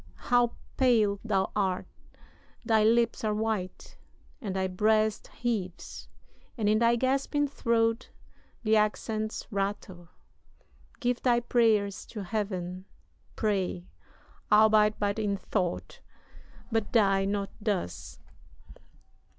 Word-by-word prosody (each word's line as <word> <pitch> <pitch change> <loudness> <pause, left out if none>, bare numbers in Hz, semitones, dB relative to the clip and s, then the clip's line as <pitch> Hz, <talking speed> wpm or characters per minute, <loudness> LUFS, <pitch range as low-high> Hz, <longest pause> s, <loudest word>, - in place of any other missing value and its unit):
how 245 -1 +4 0.2
pale 220 -6 +3
thou 195 -4 0
art 190 -3 0 0.8
thy 220 -2 +3
lips 230 +1 +2
are 215 -1 0
white 215 -4 -3 0.4
And 200 -6 -4
thy 190 0 0
breast 215 +3 +1
heaves 210 -7 -4 0.5
and 215 -3 0
in 215 +1 +3
thy 235 0 +4
gasping 275 +4 0
throat 230 -3 0 0.5
The 220 -1 +3
accents 215 0 -1
rattle. 195 -3 -4 0.9
Give 245 -2 -1
thy 240 -2 +3
prayers 220 -5 +1
to 210 -3 -6
Heaven 185 -3 -4 0.5
Pray 190 -5 -1 0.7
albeit 215 0 +5
but 205 +1 -1
in 205 -2 0
thought 185 -3 -3 0.7
but 225 -2 -1
die 195 -4 +3
not 200 0 -2
thus. 200 - -3
215 Hz, 105 wpm, -28 LUFS, 195-230 Hz, 0.9 s, albeit